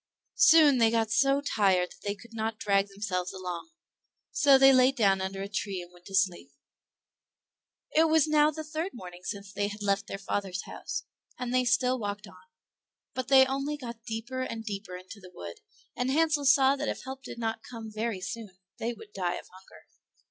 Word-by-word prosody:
Soon 305 -5 +7
they 225 -1 +5
got 225 -1 0
so 275 +5 +3
tired 190 -9 +2
that - - -16
they 200 0 -3
could 230 +4 -16
not 220 0 -3
drag 200 -1 +2
themselves 195 -3 -3
along, 180 - -6 0.6
so 280 -2 +6
they 270 0 +7
laid 255 +1 +5
down 195 -6 +3
under 195 +1 -3
a - - -4
tree 200 -1 -3
and 175 0 -10
went 175 0 -17
to 195 - -5
sleep. 185 -7 +1 1.5
It 320 +1 +6
was 315 -2 +5
now 300 0 +4
the 310 +1 -5
third 315 +4 -4
morning 180 -5 -10
since 200 0 -6
they 205 0 0
had 210 0 -7
left 200 0 0
their - - -5
father's 195 -1 -3
house, - - -5 0.3
and 250 0 -4
they 255 0 +3
still 255 +1 +2
walked 205 0 -4
on; 185 +8 -17 0.6
but 255 -1 -3
they 265 -1 +7
only 275 +3 -2
got 235 -4 -8
deeper 235 +3 -4
and 230 -3 -5
deeper 195 -3 -5
into 185 +3 -11
the 185 -2 -13
wood, 85 - -9 0.4
and 250 +1 -1
Hansel 300 0 +2
saw 270 0 +5
that - - -2
if - - -4
help 265 +1 -7
did 275 - -9
not 225 -1 -2
come 225 -2 -9
very 215 -3 -2
soon 210 -2 -7 0.2
they 235 +2 -2
would 210 -2 -14
die 180 -2 -1
of - - -9
hunger. 185 +1 -17
225 Hz, 200 wpm, -29 LUFS, 195-265 Hz, 1.5 s, Soon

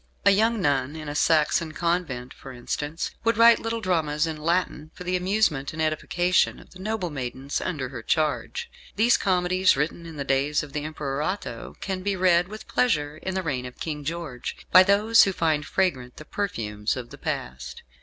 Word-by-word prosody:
A 200 - +8
young 220 +3 +3
nun 140 -3 0
in 155 -1 -7
a 145 - -3
Saxon 155 +1 +2
convent, 170 -8 -2
for 135 - -11
instance, 145 +6 -4
would 230 -1 +2
write 230 0 +7
little 230 0 -3
dramas 160 -6 +1
in 160 -1 -3
Latin 155 -1 -1
for - - -8
the 180 +1 -1
amusement 180 -7 +1
and 160 - -8
edification 170 +3 +1
of - - -17
the 185 - -14
noble 200 -3 -2
maidens 135 0 -4
under 145 -8 -3
her 125 -3 -7
charge. 155 - -1 0.3
These 230 +3 +4
comedies, 185 -2 +2
written 165 +3 -2
in 160 -2 -9
the 140 - -2
days 140 +3 +1
of 145 -2 -10
the 150 0 -3
Emperor 145 -2 -3
Otho, 155 - -4
can 190 -2 -3
be 200 +1 -1
read 180 -1 +3
with 215 +2 -10
pleasure 150 -11 +1
in 190 +3 -4
the 190 - -1
reign 130 -6 -2
of 125 - -13
King 150 -2 -4
George, 150 -5 -5
by 185 - +10
those 210 +4 +5
who 195 - 0
find 155 -5 0
fragrant 130 -10 -1
the 155 - -10
perfumes 110 - -2
of 120 -2 -7
the - - -11
past. 65 +1 -5
160 Hz, 195 wpm, -25 LUFS, 140-185 Hz, 0.3 s, by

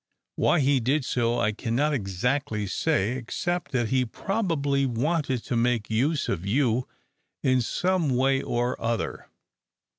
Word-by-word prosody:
Why 175 - +3
he 135 0 +3
did 130 +4 +1
so 120 -1 0
I 110 -2 +2
cannot 120 +8 0
exactly 105 +1 -1
say, 110 - 0
except 175 +8 -3
that 120 -4 +1
he 130 -1 +2
probably 145 - -1
wanted 135 +1 0
to - - -3
make 115 -2 +1
use 140 +7 +1
of 85 - -2
you 120 +3 +1 0.6
in 130 -1 +3
some 180 +5 0
way 135 +1 +2
or 120 +1 -1
other." 115 0 -2
125 Hz, 140 wpm, -26 LUFS, 115-145 Hz, 0.6 s, Why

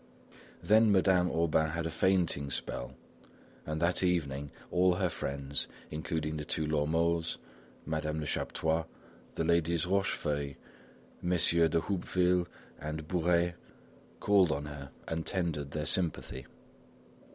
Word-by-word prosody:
Then 110 +4 +5
Madame 95 -2 +4
Aubain 80 -1 +1
had 85 0 -2
a 80 - -2
fainting 85 -7 +1
spell, 60 - -3 0.7
and 80 0 -2
that 85 +2 +2
evening 75 -6 0 0.2
all 90 0 +4
her 90 -1 +1
friends, 70 -2 -3 0.2
including 80 0 -3
the 75 - -4
two 80 +1 -1
Lormeaus, 80 +2 +1 0.5
Madame 80 0 -2
Lechaptois, 80 +2 -1 0.5
the - - 0
ladies 85 -1 +2
Rochefeuille, 75 -7 -1 0.7
Messieurs 85 -1 +4
de 80 +2 +1
Houppeville 90 -1 +1 0.3
and 75 +1 -5
Bourais, 85 0 +2 0.7
called 100 -5 +4
on 75 -1 -2
her 75 -2 -8 0.2
and 80 0 -2
tendered 80 -7 -1
their 75 +1 -3
sympathy. 75 -7 0
80 Hz, 120 wpm, -31 LUFS, 75-90 Hz, 0.7 s, Then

